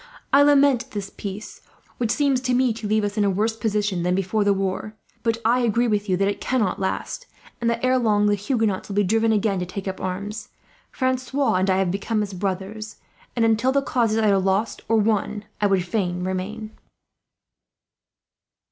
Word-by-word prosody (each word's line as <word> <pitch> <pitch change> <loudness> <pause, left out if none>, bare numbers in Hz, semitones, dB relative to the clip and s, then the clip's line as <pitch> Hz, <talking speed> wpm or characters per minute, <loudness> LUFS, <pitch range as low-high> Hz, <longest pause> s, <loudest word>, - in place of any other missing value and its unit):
"I 280 - +7
lament 285 -3 +4
this 200 -2 -5
peace, 200 +1 -7 0.4
which 235 -3 0
seems 275 0 +2
to 250 -1 0
me 255 -2 +3
to 220 -1 -6
leave 215 0 +2
us 205 +1 -2
in - - +3
a 200 - +3
worse 215 +4 0
position 210 -4 -1
than 180 +1 +1
before 195 +3 0
the 205 - +3
war; 195 +2 -2 0.3
but 230 -1 0
I 240 +2 +4
agree 240 0 +2
with 210 -2 -1
you 185 - +2
that 195 +1 +2
it 205 - -2
cannot 235 -7 0
last, 195 - -3 0.3
and 235 - +2
that 235 +1 -2
ere 255 0 +3
long 210 -3 +2
the 205 - +3
Huguenots 210 -1 -1
will 200 - -4
be 205 - +3
driven 225 +3 +2
again 205 -2 +1
to 180 - -2
take 190 +2 -6
up 190 - -4
arms. 205 +5 -4 0.4
Francois 260 +1 0
and 185 +1 +1
I 190 - +3
have 190 -2 +1
become 210 +3 -1
as 200 -1 -6
brothers 195 +3 -4 0.4
and, 230 -2 +2
until 225 +3 +2
the 275 +1 +1
cause 235 -5 +1
is - - +1
either 210 -3 +3
lost 195 +4 0
or 225 - +4
won, 210 -1 0 0.2
I 205 - +4
would 190 -2 +1
fain 180 -2 -1
remain." 195 +4 -4
210 Hz, 200 wpm, -23 LUFS, 195-230 Hz, 0.4 s, I